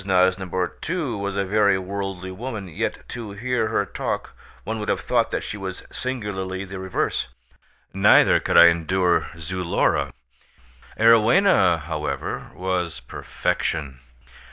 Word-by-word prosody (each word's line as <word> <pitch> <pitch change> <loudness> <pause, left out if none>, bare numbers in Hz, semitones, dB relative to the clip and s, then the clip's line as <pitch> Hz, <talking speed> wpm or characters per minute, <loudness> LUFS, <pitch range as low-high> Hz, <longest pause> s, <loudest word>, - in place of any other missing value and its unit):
Nosnibor, 95 -1 +1
too, 160 -8 -2
was 100 -1 -3
a 100 - +1
very 100 0 +3
worldly 95 -1 -5
woman, 105 0 -6
yet 80 - -4
to 115 -4 -6
hear 125 +2 -1
her 105 -2 0
talk - - -4 0.3
one 110 +1 -3
would 105 - -4
have - - 0
thought - - +1
that - - -2
she 105 - -5
was 95 -2 -6
singularly 100 -7 -4
the 95 0 -7
reverse; 95 -1 -1 0.7
neither 95 +2 +5
could - - +1
I 85 - +10
endure 85 +2 +1
Zulora; 90 +2 0 0.9
Arowhena 115 - +5
however 75 -1 -4
was 90 -4 -2
perfection. 65 +2 -3
95 Hz, 130 wpm, -23 LUFS, 90-105 Hz, 0.9 s, I